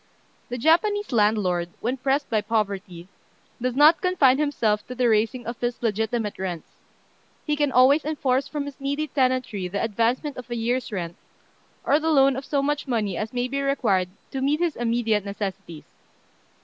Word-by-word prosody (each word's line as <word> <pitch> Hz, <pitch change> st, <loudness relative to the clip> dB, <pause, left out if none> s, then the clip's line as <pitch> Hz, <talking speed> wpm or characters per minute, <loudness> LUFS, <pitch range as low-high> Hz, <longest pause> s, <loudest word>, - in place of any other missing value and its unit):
The 245 Hz, -, -3 dB
Japanese 410 Hz, -, +2 dB
landlord, 205 Hz, -6 st, +1 dB
when 245 Hz, +4 st, -1 dB
pressed 275 Hz, +2 st, 0 dB
by 220 Hz, -2 st, +1 dB
poverty, 200 Hz, -5 st, -3 dB, 0.5 s
does 250 Hz, 0 st, -1 dB
not 300 Hz, +4 st, +6 dB
confine 295 Hz, -8 st, +3 dB
himself 225 Hz, -8 st, 0 dB
to 250 Hz, -, -7 dB
the 250 Hz, -1 st, +2 dB
raising 225 Hz, +3 st, +1 dB
of 235 Hz, +1 st, -6 dB
his 240 Hz, 0 st, -2 dB
legitimate 220 Hz, -1 st, -1 dB
rents: 180 Hz, -4 st, -5 dB, 0.8 s
he 300 Hz, -, 0 dB
can 290 Hz, -2 st, +1 dB
always 265 Hz, +5 st, +5 dB
enforce 280 Hz, -3 st, 0 dB
from 285 Hz, 0 st, -4 dB
his 285 Hz, -1 st, -9 dB
needy 285 Hz, +3 st, -1 dB
tenantry 255 Hz, -9 st, 0 dB
the 200 Hz, +3 st, -3 dB
advancement 230 Hz, +6 st, 0 dB
of 250 Hz, -1 st, -9 dB
a 240 Hz, -, -3 dB
year's 240 Hz, +2 st, -1 dB
rent, 170 Hz, -4 st, -4 dB, 0.7 s
or 290 Hz, +2 st, +3 dB
the 320 Hz, +1 st, -1 dB
loan 275 Hz, -3 st, +4 dB
of 270 Hz, +1 st, -5 dB
so 280 Hz, -1 st, 0 dB
much 295 Hz, 0 st, -1 dB
money 215 Hz, -7 st, -1 dB
as 215 Hz, +5 st, -3 dB
may 245 Hz, 0 st, -1 dB
be 275 Hz, +2 st, -2 dB
required 220 Hz, -10 st, +1 dB, 0.2 s
to 265 Hz, -, -3 dB
meet 290 Hz, +3 st, +1 dB
his 345 Hz, -3 st, 0 dB
immediate 230 Hz, -3 st, 0 dB
necessities. 195 Hz, -5 st, -6 dB
245 Hz, 175 wpm, -24 LUFS, 210-280 Hz, 0.8 s, not